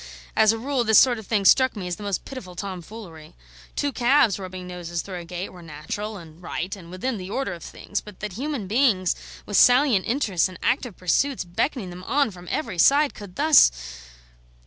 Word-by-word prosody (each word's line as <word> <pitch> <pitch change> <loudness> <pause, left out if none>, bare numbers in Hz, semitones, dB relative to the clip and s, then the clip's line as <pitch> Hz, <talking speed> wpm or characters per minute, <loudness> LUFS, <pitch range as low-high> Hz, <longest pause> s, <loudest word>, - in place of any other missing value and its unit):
As 220 -1 +5
a 225 - -2
rule 260 +2 -1
this 220 -1 +5
sort 245 -3 +5
of 220 - -12
thing 205 -3 0
struck 260 +4 +5
me 190 -4 -5
as 175 - -3
the - - -12
most 200 -2 -3
pitiful 205 -10 -9
tomfoolery. 180 -3 -8 0.4
Two 285 - 0
calves 245 -5 +3
rubbing 185 -1 -7
noses 175 -2 -5
through 185 -3 -6
a 170 - -9
gate 180 +2 -5
were 180 - -13
natural 170 +7 -6
and 165 -1 -13
right 180 +2 -4
and 175 -4 -13
within 215 +7 -3
the 185 0 -7
order 235 -3 -2
of 170 - -10
things; 205 - -5
but 210 -2 -13
that 210 -2 -5
human 265 0 -3
beings, 205 -4 +2 0.3
with 205 - -1
salient 250 -5 +5
interests 215 -9 +1
and 185 - -11
active 245 -5 0
pursuits 210 - 0
beckoning 185 - -2
them 180 +1 -10
on 275 -1 +1
from 180 -1 -13
every 190 - -3
side, 285 - +5
could 200 -4 -11
thus 300 - +6
200 Hz, 200 wpm, -24 LUFS, 180-250 Hz, 0.4 s, thus